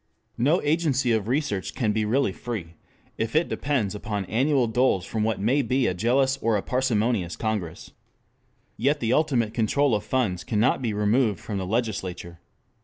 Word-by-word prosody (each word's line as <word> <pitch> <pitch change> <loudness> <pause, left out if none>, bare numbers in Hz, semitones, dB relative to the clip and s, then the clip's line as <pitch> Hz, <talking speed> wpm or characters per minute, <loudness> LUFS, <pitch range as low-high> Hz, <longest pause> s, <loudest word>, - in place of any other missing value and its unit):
No 150 +9 +3
agency 145 -5 +1
of 110 -2 0
research 125 -7 -1
can 110 -5 +1
be 110 0 0
really 120 0 +1
free 95 -6 -6 0.5
if 115 +4 -2
it 160 +2 +3
depends 130 -9 -1
upon 105 -1 -4
annual 130 +5 +2
doles 115 -5 +1
from 110 +1 -2
what 110 -2 0
may 125 +8 +2
be 130 +1 +1
a 95 - +1
jealous 130 +7 +2
or 115 -2 +2
a 100 - -3
parsimonious 115 -7 0
congress. 105 -7 -4 0.9
Yet 140 +6 +1
the 115 +1 0
ultimate 130 -8 +1
control 125 +4 +2
of 105 - 0
funds 110 -9 -1
cannot 120 +3 +1
be 120 -3 -1
removed 105 +1 +1
from 100 -3 -4
the 95 - -4
legislature. 95 -6 -3
115 Hz, 170 wpm, -25 LUFS, 105-130 Hz, 0.9 s, No